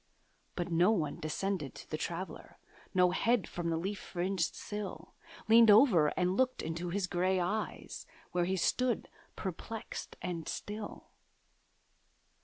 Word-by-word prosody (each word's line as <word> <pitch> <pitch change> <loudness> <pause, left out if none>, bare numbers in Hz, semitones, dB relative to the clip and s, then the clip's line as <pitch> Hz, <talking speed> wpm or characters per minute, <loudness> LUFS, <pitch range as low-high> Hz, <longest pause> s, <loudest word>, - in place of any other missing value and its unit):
But 175 -1 -3
no 170 +4 +5
one 160 -8 0
descended 155 -1 -2
to - - -10
the - - -3
Traveller; 170 +4 -5 0.3
No 180 -2 +4
head 230 +3 +2
from 175 -1 -3
the 165 - +1
leaf 195 +4 -3
fringed 180 -1 -1
sill 210 -1 -6 0.3
Leaned 225 0 +8
over 205 - +7
and 180 0 +2
looked 255 +1 +1
into 165 +2 -3
his 195 +2 0
grey 185 +1 +1
eyes, 205 +5 -3 0.2
Where 175 -1 +1
he 190 +2 0
stood 250 +6 +1 0.3
perplexed 205 +4 -6
and 170 -3 -4
still. 210 0 -6
185 Hz, 135 wpm, -33 LUFS, 170-210 Hz, 0.3 s, Leaned